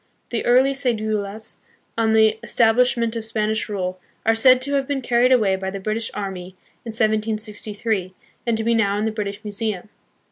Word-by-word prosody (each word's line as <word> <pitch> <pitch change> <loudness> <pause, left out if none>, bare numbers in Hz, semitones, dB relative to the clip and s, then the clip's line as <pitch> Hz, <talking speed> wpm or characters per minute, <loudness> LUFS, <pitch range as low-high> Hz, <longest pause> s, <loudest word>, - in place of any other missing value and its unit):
The 235 - -1
early 260 +3 +5
ce"dulas, 215 -5 -3 0.4
on 225 -1 +2
the 220 0 +4
establishment 235 0 +2
of 230 - -3
Spanish 220 0 -1
rule, 185 -2 -3 0.3
are 225 - +4
said 255 +3 +6
to 280 +1 -3
have 275 -1 +1
been 280 -2 -1
carried 245 +1 +3
away 215 -7 +4
by 190 0 -4
the 195 +1 -5
British 215 +3 -2
army 190 -2 -5 0.3
in 235 - -7
1763, 215 -3 -1 0.3
and 230 -1 +2
to 220 - -2
be 230 +1 +2
now 205 -3 +2
in 210 - -1
the 220 - 0
British 210 -1 -5
Museum. 210 -2 -3
220 Hz, 175 wpm, -22 LUFS, 205-230 Hz, 0.4 s, said